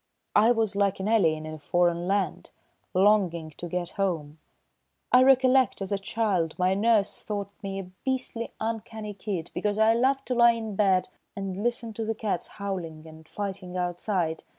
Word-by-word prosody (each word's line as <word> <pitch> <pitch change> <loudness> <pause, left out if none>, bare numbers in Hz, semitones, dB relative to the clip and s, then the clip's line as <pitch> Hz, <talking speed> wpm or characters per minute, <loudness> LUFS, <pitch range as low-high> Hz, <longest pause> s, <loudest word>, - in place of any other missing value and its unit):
I 220 +3 +6
was 225 -4 +1
like 200 -1 +1
an 190 - -2
alien 165 -9 +2
in 155 - -6
a 155 - -8
foreign 175 +3 +1
land, 195 -3 -1 0.5
longing 185 -5 +3
to 175 +3 -8
get 175 0 -3
home. 160 -5 -2 0.7
I 250 - +7
recollect, 260 0 +4
as 195 0 -3
a 200 - 0
child, 195 -6 -1
my 185 +1 +2
nurse 210 0 +2
thought 200 -2 -4
me 195 -1 -4
a 195 - -3 0.2
beastly 255 -3 -2
uncanny 220 -1 -4
kid 190 -4 -5
because 205 0 -1
I 220 +1 +5
loved 265 +3 +1
to 255 - -1
lie 235 -1 +6
in 220 -3 -5
bed 190 -2 +2 0.3
and 195 -2 -4
listen 230 +2 -2
to 225 - -4
the 220 0 -2
cats 210 -5 -2
howling 175 -6 -5
and 160 0 -14
fighting 190 -3 -5
outside. 175 -2 -1
200 Hz, 175 wpm, -27 LUFS, 180-225 Hz, 0.7 s, I